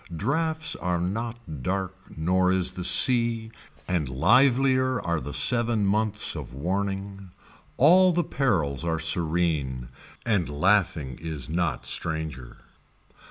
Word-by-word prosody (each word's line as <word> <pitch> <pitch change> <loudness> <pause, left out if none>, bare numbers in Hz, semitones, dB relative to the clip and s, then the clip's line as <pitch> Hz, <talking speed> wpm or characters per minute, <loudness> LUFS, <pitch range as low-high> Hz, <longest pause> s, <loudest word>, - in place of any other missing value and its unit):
Drafts 160 - 0
are 90 -1 -1
not 100 - -5
dark 95 +4 -2 0.2
nor 90 +3 +2
is 95 -1 +1
the 90 - -7
sea 115 +2 +3 0.4
and 85 -7 -1
livelier 130 - +3
are 85 -4 -2
the 70 - -7
seven 115 +8 +1
months 105 +1 0
of - - -8
warning. 95 +4 -4 0.5
All 180 +6 +6
the 175 0 0
perils 90 - -1
are 80 -1 -1
serene, 80 -6 -1 0.4
and 100 -9 0
laughing 75 -4 0
is 75 -5 -5
not 85 0 -2
stranger. 80 -6 -4
95 Hz, 115 wpm, -25 LUFS, 80-115 Hz, 0.5 s, All